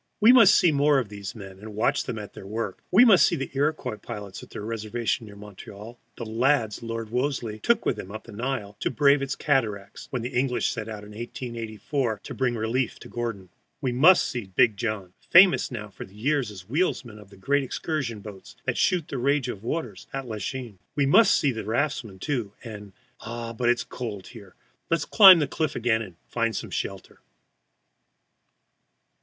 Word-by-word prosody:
We 220 +3 +7
must 235 -6 +7
see 175 - +5
more 145 0 +3
of 125 -6 -1
these 100 -2 -7
men, 95 -3 -10
and 105 0 -10
watch 120 +7 +1
them 120 -3 -4
at 105 -1 -8
their 95 - -10
work. 105 -2 -4
We 220 +7 +7
must 195 - +7
see - - +3
the 135 -4 -5
Iroquois 145 -5 -1
pilots 100 -1 -8
at - - -13
their - - -7
reservation 115 0 -3
near 100 - -12
Montreal, 105 +3 -11 0.2
the 115 - -5
lads 115 0 +1
Lord 115 -1 -5
Wolseley 125 -4 -2
took 235 - +1
with - - 0
him 95 - -7
up 110 +1 -7
the 115 - -13
Nile 115 -2 -4
to - - 0
brave 140 -1 +4
its 135 0 -2
cataracts, 110 -8 -1
when 125 -3 -3
the 125 +2 -5
English 125 0 +1
set 110 -1 -5
out, 105 -1 -7
in 105 - -12
1884, 115 +1 -4
to - - -7
bring 125 -2 0
relief 115 +2 -1
to - - -12
Gordon. 115 -6 -5 0.3
We 130 -3 -1
must 160 +9 +6
see 120 -5 -4
"Big 100 +4 +3
John," 100 -4 -4 0.2
famous 185 +2 +6
now 105 -4 -6
for - - -9
years 120 +6 -1
as 95 -3 -11
wheelsman 125 - -1
of 105 -2 -15
the 100 - -16
great 140 +8 +1
excursion 130 -5 -3
boats 100 -2 -11
that - - -1
shoot 175 -4 +2
the 135 - -4
rage 140 0 +1
of 100 -5 -6
waters 160 +7 -4
at 135 -1 -5
Lachine. 110 0 -5 0.2
We 145 - +2
must 205 +9 +6
see 140 - +2
the 110 -2 -5
raftsmen, 115 -2 -2
too, 120 -4 -3
and 105 -3 -9 0.3
ah, 115 0 -6
but 120 +1 0
it - - +7
is 115 - -4
cold 105 -6 -7
here! 100 -6 -13 0.3
let 165 - +4
us 160 - -3
climb 195 -4 +9
the 155 - +1
cliff 155 -3 -2
again 115 -1 +1
and 95 -6 -8
find 115 -2 -1
some - - -5
shelter. 95 -1 -5
115 Hz, 200 wpm, -25 LUFS, 105-135 Hz, 0.3 s, climb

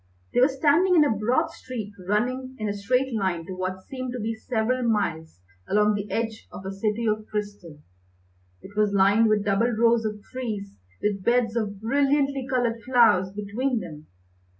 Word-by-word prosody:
They 245 - +3
were 255 - +7
standing 305 +7 +3
in 305 -3 +6
a 225 - +1
broad 215 +5 +1
street 220 -5 -7
running 255 +5 -1
in 215 - -3
a 205 - -1
straight 250 +6 0
line 190 -6 -1
to 190 - -6
what 185 0 -4
seemed 255 +1 -6
to 250 - -4
be 225 +1 -2
several 230 +2 -1
miles 195 - -1 0.3
along 210 +1 +3
the 205 0 -4
edge 225 -1 -3
of 190 - -9
a 190 - -3
city 215 +3 -1
of 215 0 -1
crystal. 205 -7 -5 0.8
It 200 - -12
was 210 -1 +2
lined 200 +3 +4
with 210 -1 +2
double 205 +4 +2
rows 230 0 +3
of 210 -1 -4
trees 215 -6 -5 0.3
with 200 -2 0
beds 235 0 +2
of 205 -4 -2
brilliantly 275 +3 +1
coloured 240 -3 0
flowers 230 -7 +4
between 215 +5 -2
them. 155 -6 -9
220 Hz, 175 wpm, -25 LUFS, 200-250 Hz, 0.8 s, were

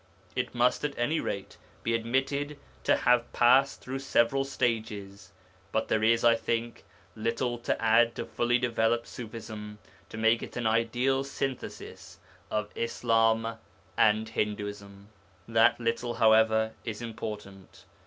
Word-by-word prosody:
It - - -2
must, 120 +3 +2
at 145 -1 -2
any 150 +7 +1
rate, 100 - -5 0.3
be 115 - 0
admitted 135 +5 -1 0.3
to - - +5
have 120 -1 +2
passed 130 +3 +4
through 130 +1 -5
several 135 0 +2
stages, 105 -7 -3 0.4
but 110 - -1
there 110 - +1
is, 115 +1 +3
I 115 0 +6
think, 115 +1 -3 0.3
little 115 +2 -2
to 120 - -1
add 115 +1 +4
to - - -4
fully 120 +1 +1
developed 115 -1 +1
Ṣufism 110 -2 -8 0.3
to - - -8
make 115 +1 +3
it - - -7
an 120 - -2
ideal 120 +4 +1
synthesis 135 -1 -6 0.3
of 105 -1 -2
Islam 115 -1 +1 0.4
and 110 +1 +3
Hinduism. 105 -2 -4 0.4
That 115 +1 +4
little, 115 0 -1
however, 110 0 +4
is 110 0 -5
important. 105 -4 -8
115 Hz, 135 wpm, -29 LUFS, 110-120 Hz, 0.4 s, I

